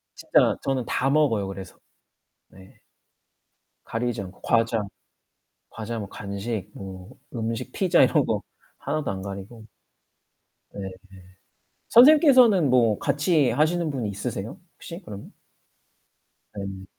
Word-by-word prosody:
진짜 - - +2
저는 130 -3 -1
다 135 +2 0
먹어요, 135 -10 +2
그래서. 95 -1 -9 0.7
네. 95 0 -18 1.1
가리지 120 -1 -3
않고 95 0 -11
과자 115 -1 +1 0.9
과자 115 +1 -6
뭐 100 - -6
간식 100 +1 -5
뭐 95 0 -9 0.3
음식 115 +2 -3
피자 180 -3 +3
이런 - - +3
거 - - -1 0.4
하나도 150 -2 -2
안 95 -1 -5
가리고. 100 +3 -9 1.0
네. 100 -1 -6 1.0
선생님께서는 250 - +6
뭐 115 -5 +3
같이 145 -1 +2
하시는 155 +5 +1
분이 125 -7 -3
있으세요? 100 +1 -5 0.2
혹시 170 +2 -9
그러면? 100 -1 -10 1.2
네. 95 -1 -6
115 Hz, 225 characters per minute, -24 LUFS, 100-145 Hz, 1.2 s, 선생님께서는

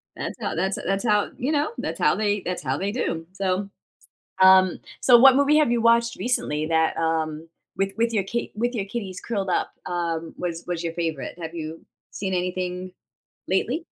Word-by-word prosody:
That's - - -5
how - - -2
that's 190 +1 0
that's 195 +3 0
how, 210 -2 +2
you 265 +5 -1
know, 295 0 +1
that's - - -4
how - - +3
they 205 -1 0
that's 180 -3 -4
how 135 -1 -1
they 195 +4 -2
do, 165 -8 -2
so, 195 0 -1 0.7
um 185 -1 +6 0.2
so, 245 -2 +7
what 265 +1 +8
movie 285 +2 +4
have 300 -6 +3
you 235 - +1
watched 235 0 +3
recently 155 -11 0
that, 160 -1 +2
um 160 -1 -1 0.3
with 195 0 0
with 230 0 +1
your 205 -3 +1
kit 235 +5 -3
with 240 +3 -1
your 205 -5 -2
kitties 195 -3 -5
curled 200 -5 -2
up, - - 0
um, 165 -2 -3
was 170 -1 -4
was 175 -1 -3
your 165 -1 -3
favorite? 165 -3 -3
Have 165 0 -5
you 160 0 -6 0.3
seen 190 -1 -3
anything 180 0 -2 0.6
lately? 245 - 0
190 Hz, 190 wpm, -24 LUFS, 170-230 Hz, 0.7 s, what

